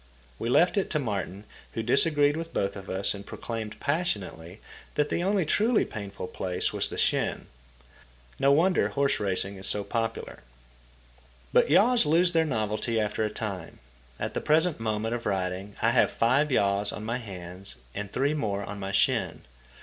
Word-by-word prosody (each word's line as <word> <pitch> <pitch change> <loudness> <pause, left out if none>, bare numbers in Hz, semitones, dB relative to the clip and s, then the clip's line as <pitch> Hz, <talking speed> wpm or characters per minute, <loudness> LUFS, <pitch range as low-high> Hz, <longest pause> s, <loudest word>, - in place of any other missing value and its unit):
We 115 - -2
left 175 - +4
it 195 - -2
to 155 - 0
Martin, 100 - -3 0.3
who 115 - -2
disagreed 145 +4 +4
with 165 +1 -6
both 100 0 0
of 95 -1 -9
us 95 +1 -1
and 100 -1 -8
proclaimed 110 +1 -6
passionately 105 - -2 0.4
that 150 0 +1
the - - 0
only 190 -1 +1
truly 220 +9 +3
painful 100 -3 -6
place 90 -1 -2
was - - 0
the - - -7
shin. - - 0 0.9
No 140 - +4
wonder 175 +6 +4
horse 140 0 0
racing 100 0 -2
is 95 - -7
so 105 - -1
popular. 115 +1 -3 1.1
But - - +5
yaws 210 +4 +5
lose 170 +3 +4
their 165 -2 +3
novelty 110 -3 -1
after 105 0 -1
a 105 - 0
time. 100 -6 -5 0.4
At - - -3
the - - -2
present 160 0 +2
moment 110 0 -1
of 120 -1 -3
writing 95 0 -2
I 115 - +4
have 130 - +4
five 135 +6 +2
yaws 100 -3 +2
on 105 - -6
my 115 +2 -1
hands 95 -3 -9 0.2
and 100 0 -5
three 140 +3 +1
more 100 -9 -1
on 100 0 -6
my 95 0 -4
shin. 100 - +1
110 Hz, 175 wpm, -27 LUFS, 100-150 Hz, 1.1 s, But